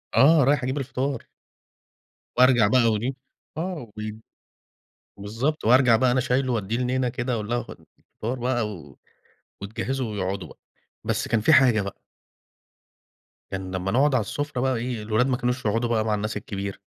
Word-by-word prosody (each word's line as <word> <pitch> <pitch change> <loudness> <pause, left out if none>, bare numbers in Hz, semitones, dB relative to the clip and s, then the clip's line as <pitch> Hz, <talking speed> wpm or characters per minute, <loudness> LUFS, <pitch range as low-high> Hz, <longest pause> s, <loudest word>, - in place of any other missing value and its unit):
آه، 145 +6 +6
رايح 140 0 +2
أجِيب 130 +3 -1
الفطار. 135 -1 -3 1.1
وأرجع 125 -4 +6
بقى 125 +1 +4
وإيه 110 +5 -1 0.5
آه، 160 - -4
وب 110 +1 -6 1.0
بالضبط، 115 +10 -2
وأرجع 120 0 +6
بقى 125 +1 +3
أنا 130 - +2
شايِله 130 +1 0
وادِيه 110 0 -1
لنينا 125 +1 0
كده 125 +1 -3
وأقول 110 -3 -3
لها: 120 0 0
"خُدي - - -13
الفطار 120 +4 -6
بقى."، 120 -3 0
و 75 -10 -10 0.7
وتجهّزه 130 +6 -3
ويقعُدوا 100 -3 -3
بقى. - - -16 0.5
بس - - -1
كان 115 -1 +2
في 135 +9 +3
حاجة 120 -7 +5
بقى 100 0 -7 1.5
كان 95 -1 -5
لما 95 +1 -2
نقعُد 140 +2 +3
على 125 - +3
السُّفرة 140 +5 -3
بقى 130 0 +1
إيه، 120 -1 -3
الولاد 110 +4 +1
ما 125 -2 +1
كانوش 125 0 -2
يقعُدوا 115 +3 +1
بقى 110 -2 +1
مع 110 - +1
الناس 105 +1 -3
الكِبيرة. 100 -1 -5
120 Hz, 165 wpm, -25 LUFS, 105-130 Hz, 1.5 s, آه